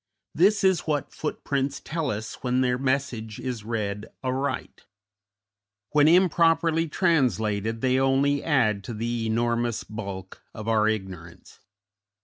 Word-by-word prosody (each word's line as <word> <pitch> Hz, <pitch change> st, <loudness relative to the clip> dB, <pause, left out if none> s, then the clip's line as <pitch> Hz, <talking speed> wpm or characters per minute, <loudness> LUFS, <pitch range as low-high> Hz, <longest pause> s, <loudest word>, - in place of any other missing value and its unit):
This 200 Hz, +5 st, +3 dB
is 190 Hz, -4 st, +2 dB
what 145 Hz, -2 st, -1 dB
footprints 140 Hz, -2 st, -2 dB
tell 160 Hz, -3 st, -3 dB
us 110 Hz, -1 st, -5 dB
when 125 Hz, 0 st, +1 dB
their 125 Hz, -1 st, +1 dB
message 130 Hz, -5 st, -2 dB
is 125 Hz, -5 st, -4 dB
read 105 Hz, -2 st, -3 dB, 0.2 s
aright; 130 Hz, +2 st, -3 dB, 1.0 s
when 150 Hz, 0 st, +5 dB
improperly 165 Hz, -1 st, +3 dB
translated 115 Hz, -, +1 dB
they 130 Hz, 0 st, +2 dB
only 135 Hz, +2 st, +2 dB
add 110 Hz, -10 st, +2 dB
to 120 Hz, -, -5 dB
the 115 Hz, +1 st, -2 dB
enormous 120 Hz, +1 st, 0 dB
bulk 100 Hz, -4 st, -7 dB
of 110 Hz, 0 st, -7 dB
our 110 Hz, -1 st, +3 dB
ignorance. 95 Hz, -6 st, -5 dB
125 Hz, 125 wpm, -25 LUFS, 110-145 Hz, 1.0 s, when